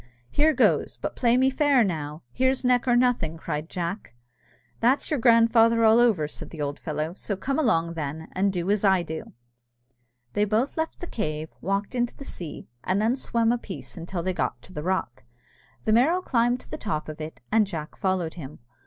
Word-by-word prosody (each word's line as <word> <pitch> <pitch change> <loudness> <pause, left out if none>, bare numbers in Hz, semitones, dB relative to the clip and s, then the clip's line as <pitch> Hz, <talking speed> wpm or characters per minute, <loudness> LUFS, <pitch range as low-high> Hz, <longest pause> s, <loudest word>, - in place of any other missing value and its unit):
Here 310 +2 +4
goes 285 - +2
but - - -4
play 240 -1 +3
me 260 +1 +4
fair 275 -2 +4
now. 155 -5 -3
Here's 260 +1 +1
neck 250 0 +3
or 245 - +4
nothing!" 240 -10 +2
cried 155 0 -4
Jack. 175 - -4 0.6
"That's 260 +7 +2
your 300 - +1
grandfather 230 -1 +5
all 220 +1 +6
over," 215 -11 +3
said - - -8
the 160 - -10
old 145 0 -3
fellow; 155 0 -3
"so 200 - -4
come 270 +9 -2
along, 170 - +2
then, 160 0 -5
and 195 +1 +1
do 180 +1 -1
as 210 0 +1
I 190 -3 +4
do." 160 -1 -7 1.0
They 205 - +2
both 220 +6 0
left 320 0 -3
the - - -3
cave, 155 - -4
walked 195 +3 -1
into 240 -1 -1
the 275 - -9
sea, 170 - -7 0.2
and 185 +2 +1
then 225 +4 +2
swam 235 -3 +1
a 240 - 0
piece 195 -5 -8
until 170 0 -5
they 185 +1 0
got - - -2
to 185 - -13
the 150 - -4
rock. 150 - -2 0.6
The 215 - +2
Merrow 320 +11 +3
climbed 245 -2 +1
to - - -16
the - - -4
top 170 -8 -3
of 155 0 -7
it, 155 +1 -7
and 215 -1 +4
Jack 160 -5 -6
followed 185 -4 -1
him. 150 -4 -9
200 Hz, 200 wpm, -26 LUFS, 165-240 Hz, 1.0 s, all